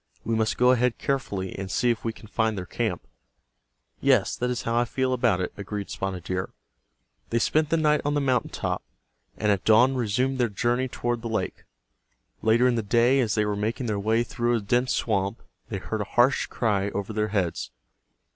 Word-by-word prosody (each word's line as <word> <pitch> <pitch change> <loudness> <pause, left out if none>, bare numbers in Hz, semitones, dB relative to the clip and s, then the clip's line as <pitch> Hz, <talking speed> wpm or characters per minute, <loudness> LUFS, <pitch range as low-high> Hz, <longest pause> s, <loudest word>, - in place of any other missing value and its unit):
We 115 - -1
must 110 -1 +1
go 125 +1 +5
ahead 125 -1 +2
carefully, 110 -9 -2
and 95 -1 -5
see 120 +6 +2
if 115 - -3
we 115 - -1
can 110 - -14
find 110 0 0
their 90 - -4
camp." - - -3 0.9
"Yes, - - +3
that 125 - -1
is 125 +1 -2
how 115 - -1
I 120 - +4
feel 130 +2 -1
about 105 -7 +2
it," 90 - -3
agreed 100 0 -5
Spotted 95 -3 -4
Deer. 90 0 -3 0.8
They 115 - +1
spent 150 +5 +2
the 165 - +2
night 150 -1 +3
on 145 0 0
the - - +2
mountain 130 -4 +1
top, - - -3 0.6
and 105 -1 +2
at 100 -1 0
dawn 120 +5 +5
resumed 125 +2 0
their 120 -2 +2
journey 120 +5 0
toward 120 -1 -2
the 115 - -4
lake. 110 -4 -3 0.8
Later 115 +3 +4
in 125 - +3
the 115 - 0
day, 120 +5 +3
as 115 -5 +1
they 105 -1 +2
were 105 0 -1
making 110 +5 -2
their 105 -3 -1
way 110 +3 +2
through 120 0 0
a - - +1
dense 120 +5 +1
swamp, 100 0 -1 0.3
they 100 - -3
heard 110 +3 -4
a 100 - -7
harsh 125 +3 +4
cry 100 -4 0
over 100 +2 -4
their 105 0 0
heads. 95 -5 -1
115 Hz, 205 wpm, -26 LUFS, 105-125 Hz, 0.9 s, go